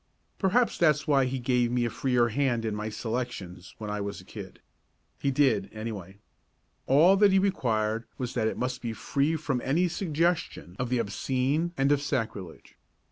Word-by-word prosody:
Perhaps 225 +5 +2
that's 150 -3 +3
why 140 -3 +4
he 130 +1 -2
gave 125 -1 +1
me 120 -1 +1
a - - 0
freer 125 -3 +1
hand 120 -2 0
in 110 - -1
my 105 +1 -3
selections 110 -6 -5
when 105 -1 -5
I 105 0 -2
was 100 0 -4
a - - -12
kid. - - -10 0.6
He 140 - 0
did, 135 -7 +2
anyway. 105 -4 -6 0.7
All 160 +8 +6
that 205 0 +5
he 190 - +4
required 115 - 0
was 125 -2 -4
that 110 -3 +1
it - - -2
must 125 0 -2
be 115 -2 -3
free 140 +7 0
from 145 -5 -2
any 165 +7 +2
suggestion 170 - -1
of 125 -1 -1
the 125 - +1
obscene 130 +8 0
and 135 +1 +2
of 145 -1 +3
sacrilege. 110 - -4
125 Hz, 180 wpm, -28 LUFS, 110-145 Hz, 0.7 s, All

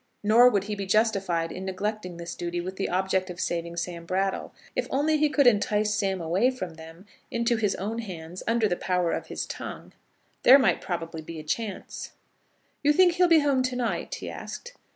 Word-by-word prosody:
Nor 230 +4 +7
would 200 -5 +1
he 210 +1 -4
be 200 -2 -4
justified 195 -6 +1
in 185 - -6
neglecting 190 -1 -3
this 170 0 -6
duty 175 0 -3
with 185 +2 -5
the 195 - -1
object 190 0 0
of 175 0 -7
saving 170 0 -2
Sam 170 0 -4
Brattle. 190 +1 -1 0.2
If - - -1
only 305 +3 +2
he 305 0 +3
could 285 -2 +3
entice 210 -2 +3
Sam 195 -3 0
away 175 +9 +2
from 185 -10 -5
them, 165 +3 -12 0.2
into 235 0 +1
his 210 -3 0
own 215 +5 -3
hands, 180 -5 -7
under 230 -1 +3
the 180 - 0
power 180 -2 0
of - - -3
his - - -4
tongue, - - -8 0.5
there 260 +3 +9
might 270 - +2
probably 165 -3 -4
be 160 +1 -8
a - - -8
chance. 205 +6 -4 0.7
"You 295 0 +4
think 360 +2 +5
he'll 360 +1 +4
be 330 -2 +6
home 280 -3 +2
to 255 0 -1
night?" 245 -1 -2
he - - -7
asked. 485 +1 -7
195 Hz, 200 wpm, -27 LUFS, 175-235 Hz, 0.7 s, there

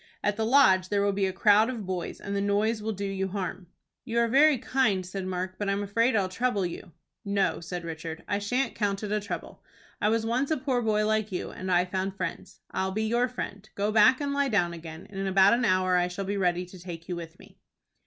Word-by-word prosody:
At 205 0 +1
the 220 +1 -1
Lodge 190 -8 +5
there 200 -1 +1
will 200 - +2
be 195 0 0
a - - -1
crowd 210 +4 +4
of 230 -6 -5
boys, 180 -2 -4
and 200 0 -4
the 200 - 0
noise 210 +2 +1
will 220 +1 -2
do 200 -1 -4
you 195 -1 -2
harm." 185 -1 -4 0.4
"You 235 -2 -3
are 235 0 +4
very 280 +4 +5
kind," 220 -7 +1
said 185 +1 -5
Mark; 185 0 -4
"but 205 -1 -1
I'm 200 +1 0
afraid 230 +5 +1
I'll 200 -3 +2
trouble 205 0 0
you." 175 0 -7 0.3
"No," 200 -3 0
said 175 +1 -6
Richard, 160 0 -6
"I 200 - 0
shan't 250 +6 -1
count 200 -1 -1
it 205 - -3
a 210 - +1
trouble. 205 0 -7 0.4
I 210 - +3
was 225 0 +1
once 250 +4 0
a 315 - +1
poor 260 -2 0
boy 215 -2 +1
like 215 -1 0
you, 180 - -4
and 185 0 -5
I 180 0 +4
found 190 +1 -3
friends. 180 -3 -6
I'll 190 0 -1
be 215 +3 -1
your 240 +3 +2
friend. 215 -4 -7
Go 205 +1 0
back 220 +4 +5
and 285 -1 -2
lie 280 -1 +1
down 180 -6 +1
again, 165 0 -9
and 195 -1 -8
in 195 - -1
about 190 +2 +5
an 240 +1 +2
hour 185 -2 +2
I 180 0 +3
shall 180 +2 -5
be 200 +1 -2
ready 180 -2 +1
to 180 +1 -13
take 170 -2 -8
you 180 - -3
with 170 0 -8
me." - - -18
200 Hz, 245 wpm, -27 LUFS, 185-220 Hz, 0.4 s, Lodge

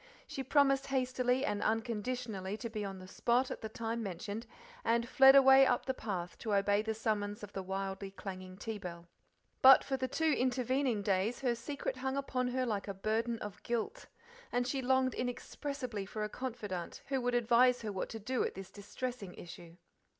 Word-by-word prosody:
She 270 - -5
promised 275 0 +3
hastily 255 0 +1
and 205 -5 -1
unconditionally 220 -3 -2
to 235 0 -6
be 215 -2 -3
on 195 -1 -5
the 185 0 -10
spot 245 +6 +1
at - - -5
the 220 - -5
time 230 +1 -3
mentioned, 205 +3 -5 0.4
and 235 +1 +2
fled 270 +1 +7
away 270 0 +8
up - - +2
the 260 - 0
path 185 -8 -5
to 215 -3 -1
obey 200 +1 +3
the 220 0 -2
summons 210 -2 -2
of 205 - -8
the 195 - -3
wildly 195 +1 -4
clanging 185 -1 -8
tea 220 0 -5
bell. 170 -2 -7 0.6
But 265 +1 +9
for 270 - -2
the 260 0 -1
two 315 +4 +1
intervening 255 -2 +1
days 200 +5 0
her 250 -3 +2
secret 260 +3 -4
hung 265 +1 -2
upon 255 -2 -1
her 255 +1 0
like 210 -4 -2
a 200 - -4
burden 225 +4 -1
of 210 -1 -7
guilt, 240 - -3 0.4
and 245 0 +1
she 265 +1 -1
longed 260 0 +2
inexpressibly 245 -3 -4
for 215 +1 -4
a 210 - -2
confidante 210 -8 -5
who 270 -2 0
would 245 0 0
advise 240 +1 +4
her 215 - -2
what 190 - -3
to 225 - -5
do 250 +4 -1
at - - -3
this 190 0 -8
distressing 205 0 -6
issue. 170 0 -11
230 Hz, 190 wpm, -33 LUFS, 205-255 Hz, 0.6 s, But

